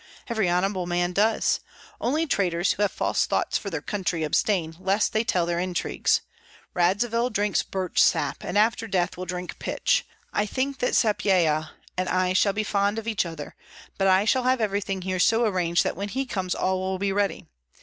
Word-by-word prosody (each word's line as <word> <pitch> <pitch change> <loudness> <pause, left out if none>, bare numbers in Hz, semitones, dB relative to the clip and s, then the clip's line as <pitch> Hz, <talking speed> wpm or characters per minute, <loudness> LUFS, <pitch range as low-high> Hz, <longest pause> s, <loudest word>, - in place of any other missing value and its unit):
every 220 -6 +1
honorable 180 +1 0
man 175 0 0
does. 215 +4 +2 0.4
Only 305 +7 0
traitors, 180 - +1
who - - -5
have 205 - +2
false - - 0
thoughts - - -1
for 200 - -5
their 160 -5 -4
country, 180 -5 -2
abstain, 165 +1 0
lest 195 +3 +1
they 220 - +2
tell 180 -6 +1
their 170 0 -1
intrigues. 180 -1 0 0.5
Radzivill 220 +7 +1
drinks 205 -3 +1
birch 190 -2 -1
sap, - - +2
and - - -2
after 225 +1 +2
death 180 -3 0
will 185 - -6
drink 180 0 -5
pitch. - - +1 0.3
I 210 - +1
think 265 +4 -2
that 250 - 0
Sapyeha 175 -8 +2 0.3
and 185 - -1
I 185 0 +1
shall 200 +2 +3
be 215 +2 -1
fond 205 +1 0
of 225 0 -5
each 215 -6 0
other; 160 -3 -8 0.5
but 195 - +3
I 190 +2 +4
shall 255 +3 +2
have 255 0 +3
everything 200 -3 -1
here 185 0 -2
so 225 +5 +4
arranged 180 -5 +1
that - - -2
when 200 +3 -4
he 265 +5 -2
comes 190 -7 -2
all 185 0 0
will 190 0 -2
be 195 +1 -1
ready. 200 0 -1
195 Hz, 190 wpm, -25 LUFS, 180-215 Hz, 0.5 s, I